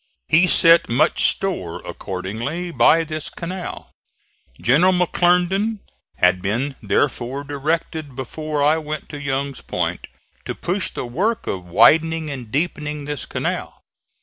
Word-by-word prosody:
He 175 +3 +5
set 165 -1 +5
much 145 +8 +3
store 95 - -2
accordingly 115 - -4
by 165 0 +4
this 155 -1 -5
canal. 180 +1 -7 0.7
General 165 +10 +4
McClernand 180 +4 +2 0.4
had 90 +1 +3
been, 120 +9 -1
therefore, 135 0 -1
directed 145 0 -3
before 150 +3 -3
I 155 +2 +3
went 155 -1 -6
to 145 -1 -7
Young's 140 -1 -2
Point - - -3 0.4
to - - -4
push 185 +2 -1
the - - -5
work 195 - -1
of 90 -2 -4
widening 160 - +4
and 125 -5 -7
deepening 150 +1 -2
this 145 -3 -5
canal. - - -4
150 Hz, 125 wpm, -21 LUFS, 135-170 Hz, 0.7 s, He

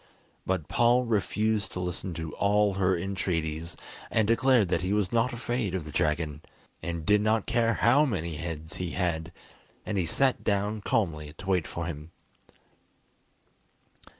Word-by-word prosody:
But 90 -5 -1
Paul 120 +1 +4
refused 110 -2 0
to - - -4
listen 90 0 -4
to 80 -2 -5
all 105 0 +2
her 95 -1 +2
entreaties, 85 -3 -2 0.3
and 110 -2 +2
declared 115 -3 +4
that - - +1
he 95 +3 0
was 105 -3 +1
not 120 +1 +2
afraid 120 -4 -2
of 90 -5 -3
the 75 - -8
dragon, 75 0 0 0.4
and 85 -2 -4
did 105 0 +4
not 110 0 +2
care 115 -1 +2
how 135 +6 +4
many 85 - -2
heads 80 -1 -5
he 90 -2 -3
had; 85 -2 -1 0.5
and 105 -2 -1
he 85 - 0
sat 130 +9 +1
down 105 +1 0
calmly 80 - -1
to - - -10
wait 90 -4 +1
for 85 - -4
him. 80 -1 -6
95 Hz, 155 wpm, -28 LUFS, 85-110 Hz, 0.5 s, Paul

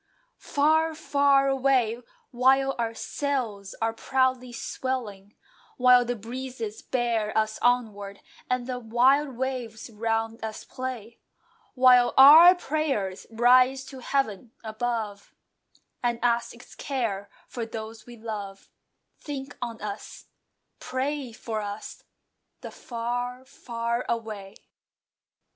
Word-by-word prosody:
Far, 315 +2 +2
far 280 -3 +3
away! 260 -4 +2 0.3
While 270 +2 +3
our 230 -1 -1
sails 230 -9 -3
are 225 0 +1
proudly 260 +1 0
swelling, 225 -5 -5 0.4
While 250 -1 +6
the 245 +1 -2
breezes 235 -1 -6
bear 230 -4 -1
us 215 0 0
onward, 215 -5 0 0.3
and 250 -1 0
the 250 0 -4
wild 255 +4 +2
waves 245 -3 -4
round 225 +1 -2
us 220 -1 -5
play, 245 -3 -7 0.6
While 250 -1 +5
our 315 +7 +10
prayers 275 - -2
rise 255 +3 +4
to 265 - -8
heaven 240 -4 -2
above, 220 -2 -4 0.7
And 240 -1 0
ask 235 0 +1
its 245 - -15
care 220 -8 -3 0.2
for 235 -2 -5
those 220 0 -8
we 240 -1 -11
love, 205 -3 -7 0.5
Think 280 -1 -7
on 235 -2 -5
us, 205 0 -7 0.5
pray 265 0 -3
for 220 -1 -5
us, 205 +1 -7 0.6
The - - -8
"Far, 245 +2 -4
far 235 -1 -3
away!" 215 -4 -4
240 Hz, 110 wpm, -26 LUFS, 220-260 Hz, 0.7 s, our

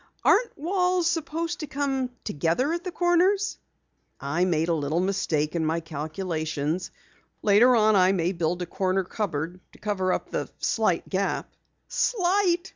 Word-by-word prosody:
"Aren't 470 +2 +3
walls 360 +2 +1
supposed 330 0 -1
to 305 - -5
come 270 -3 -1
together 170 - 0
at 340 0 -3
the 365 - -4
corners?" 360 +4 +2 0.6
"I 160 +6 0
made 165 -2 +1
a 170 - +2
little 155 +1 0
mistake 175 -5 0
in 165 - 0
my 160 +1 0
calculations. 160 0 -3 0.5
Later 220 +5 +6
on 215 -1 +4
I 185 -1 +5
may 180 -2 +1
build 175 0 -1
a - - -3
corner 190 +1 0
cupboard 175 -3 -3
to - - -16
cover 190 -3 -1
up - - -2
the - - -2
slight - - 0
gap." - - -2 0.3
"Slight!" 370 -4 +1
195 Hz, 150 wpm, -26 LUFS, -, 0.6 s, Later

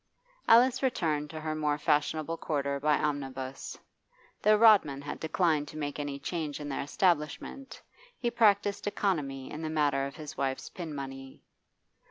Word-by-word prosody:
Alice 245 +3 +6
returned 160 - 0
to 155 - -6
her 155 0 -2
more 150 -1 0
fashionable 155 +1 0
quarter 140 -3 -2
by 150 +1 +3
omnibus. 135 -3 -4 0.6
Though 215 0 +5
Rodman 205 -11 +5
had 145 - -6
declined 160 -2 +1
to 155 - -9
make 145 -1 -4
any 145 -1 -3
change 155 -1 -4
in 150 - -6
their 135 - -2
establishment, 170 - -1 0.4
he 240 -2 -1
practised 205 -3 +2
economy 145 -11 -1
in 155 - -6
the 160 - -3
matter 145 -3 +1
of 140 - -10
his 150 -2 -8
wife's 135 -1 -2
pin 165 -5 -7
money. 135 -1 -8
150 Hz, 155 wpm, -30 LUFS, 140-175 Hz, 0.6 s, Alice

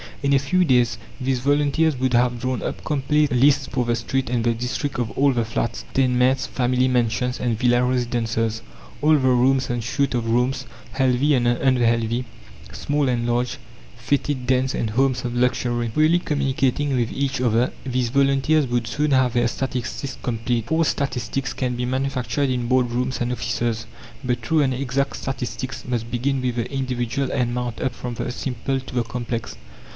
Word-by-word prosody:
In 140 0 +2
a 135 - +5
few 180 +7 +2
days 125 -5 +3 0.2
these 130 -1 0
volunteers 145 +2 +2
would 130 0 0
have 120 0 +2
drawn 130 0 -2
up - - -4
complete 150 0 +1
lists 135 +2 +4
for 125 -2 -1
the 120 0 +1
street 130 +3 -2
and 120 -2 0
the 120 0 +2
district 125 +4 -3
of 115 -3 -1
all 140 +1 +3
the 120 -3 0
flats, 115 +1 -2
tenements, 130 0 +2
family 125 0 +1
mansions 125 0 0
and 120 -3 0
villa 120 +1 +3
residences, 115 -3 -1 0.4
all 155 +2 +5
the - - +6
rooms 130 +1 +3
and 120 -1 -2
suites 140 +4 0
of 115 -2 -1
rooms, 125 +3 +1 0.3
healthy 135 +2 +2
and 120 -2 +1
unhealthy, 120 -1 +2 0.5
small 145 -2 0
and 120 -1 0
large, 120 +1 0 0.4
foetid 130 +1 -1
dens 130 0 +2
and 110 - -1
homes 130 +2 +1
of 120 0 -3
luxury. 120 -1 0
Freely 155 +8 +3
communicating 140 -2 0
with 120 -2 0
each 135 -1 -1
other, 120 0 +2
these 125 -2 -1
volunteers 140 +3 +2
would 120 -2 -1
soon 150 +3 0
have 130 -2 +3
their 120 -1 +2
statistics 130 +1 -4
complete. 115 -1 -2
False 160 0 +2
statistics 135 0 -2
can 125 -2 -2
be 125 0 -2
manufactured 135 +1 -1
in 125 -2 -1
board 125 -1 +2
rooms 125 +2 -2
and 120 0 0
offices, 115 -2 -2 0.4
but 125 -1 -1
true 155 +7 +2
and 135 -2 +2
exact 135 +1 -1
statistics 130 0 -4
must 120 -2 -2
begin 130 +3 0
with 125 -2 -1
the 120 +1 -3
individual 130 -1 -2
and 125 -3 0
mount 125 -2 -3
up 130 - -1
from 120 -1 -6
the 125 - -3
simple 135 +1 -2
to 130 -1 -10
the 120 - +2
complex. 115 - -4
125 Hz, 180 wpm, -22 LUFS, 120-135 Hz, 0.5 s, the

